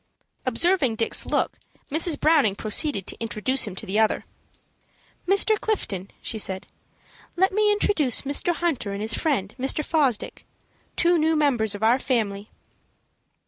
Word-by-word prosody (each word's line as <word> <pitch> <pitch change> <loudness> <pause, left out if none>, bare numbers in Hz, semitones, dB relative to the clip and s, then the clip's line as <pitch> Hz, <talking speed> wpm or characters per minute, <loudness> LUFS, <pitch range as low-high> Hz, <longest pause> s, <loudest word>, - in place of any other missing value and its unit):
Observing 275 -1 +2
Dick's 225 +1 0
look, - - -1 0.3
Mrs. 320 +1 +2
Browning 295 -11 +3
proceeded 215 - -1
to - - -4
introduce 230 +4 +1
him 190 - -6
to 205 - -6
the 205 +2 -1
other. 220 -1 +1 1.0
"Mr. 400 +3 +3
Clifton," 200 - -2
she 220 - -4
said, 190 -2 -1 0.7
"let 380 +2 +3
me 420 +1 +2
introduce 330 - +2
Mr. 285 +5 0
Hunter 285 -13 -2
and 200 - -5
his 220 +1 +2
friend, 240 - -1
Mr. 270 +4 0
Fosdick, 280 -9 -1 0.5
two 345 -1 +3
new 320 +1 +2
members 245 -9 +1
of 205 - -7
our 235 +4 +4
family." 215 -6 -2
260 Hz, 140 wpm, -24 LUFS, 215-325 Hz, 1.0 s, our